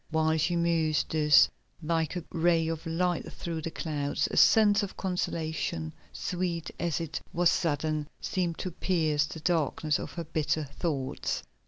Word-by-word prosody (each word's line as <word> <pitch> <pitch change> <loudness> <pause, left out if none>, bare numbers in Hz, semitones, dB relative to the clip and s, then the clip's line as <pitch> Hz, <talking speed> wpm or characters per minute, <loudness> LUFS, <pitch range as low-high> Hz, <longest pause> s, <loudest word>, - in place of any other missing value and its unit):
While 160 0 +2
she 165 +3 +1
mused 165 -2 +1
thus, 150 -2 +6 0.4
like 160 0 0
a 175 - -3
ray 165 -1 +2
of 165 +1 -4
light 175 +1 -1
through 165 -2 -5
the 165 - -3
clouds, 150 -3 -1
a - - -3
sense 215 -1 +6
of 200 -2 -5
consolation, 160 - -2 0.2
sweet 175 -2 -3
as 170 -3 0
it 160 -1 -4
was 175 0 +3
sudden, 155 -3 0
seemed 175 -3 -1
to 185 - -4
pierce 155 -4 +1
the 160 +1 -8
darkness 155 -2 +1
of - - -6
her 170 - -4
bitter 155 -1 -1
thoughts. 140 -2 -3
160 Hz, 155 wpm, -29 LUFS, 155-175 Hz, 0.4 s, thus